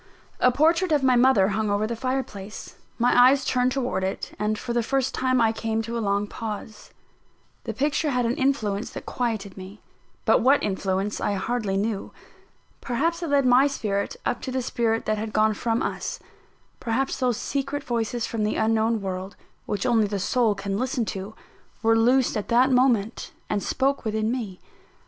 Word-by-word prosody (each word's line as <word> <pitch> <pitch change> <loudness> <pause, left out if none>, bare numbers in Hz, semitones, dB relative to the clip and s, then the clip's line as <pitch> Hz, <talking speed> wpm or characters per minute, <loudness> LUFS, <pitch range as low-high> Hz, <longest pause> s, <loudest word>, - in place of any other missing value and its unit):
A 250 - +5
portrait 330 +6 +2
of 295 -3 +3
my 255 -1 +4
mother 240 -6 +4
hung 215 +1 -1
over 205 +1 +1
the 230 +2 -3
fireplace: 230 -5 -4 0.2
my 245 +1 +3
eyes 260 +2 +6
turned 250 0 +1
towards 250 -7 -1
it, 190 +1 -3
and 210 0 0
for 235 - -4
the 240 - +2
first 265 +2 0
time 255 -1 +1
I 225 -1 +4
came 225 0 -2
to 230 +1 -5
a 230 - -1
long 200 -1 0
pause. 215 0 -7 0.8
The 225 - -3
picture 295 +4 0
had 250 -3 +1
an 230 - +1
influence 230 -6 0
that - - -7
quieted 220 -6 -3
me; 190 +2 -10 0.5
but - - +4
what 270 +4 +4
influence 195 +1 -1
I 205 - 0
hardly 205 -1 -1
knew. 205 0 -2 0.7
Perhaps 330 +8 -1
it 335 - -3
led 280 -2 +3
my 255 +3 +5
spirit 210 - -2
up - - -1
to 260 - -5
the 260 0 -1
spirit 225 -1 0
that 215 0 0
had 220 0 -5
gone 215 0 +3
from 225 +2 -1
us - - -3 0.6
perhaps 255 +4 -1
those 250 -4 +1
secret 280 +1 -3
voices 235 -1 -2
from 225 -2 -3
the 210 - 0
unknown 220 0 +1
world, 190 +1 -5 0.3
which 200 -2 -2
only 225 -4 +3
the 200 0 -2
soul 220 +2 +1
can 195 0 -3
listen 255 -2 -1
to, 195 +3 -7 0.5
were 225 0 +4
loosed 245 +3 +3
at 210 - -3
that 250 +3 +4
moment, 245 -4 +1 0.2
and 205 - 0
spoke 275 +5 0
within 220 0 -1
me. 220 -8 -4
230 Hz, 185 wpm, -25 LUFS, 210-255 Hz, 0.8 s, eyes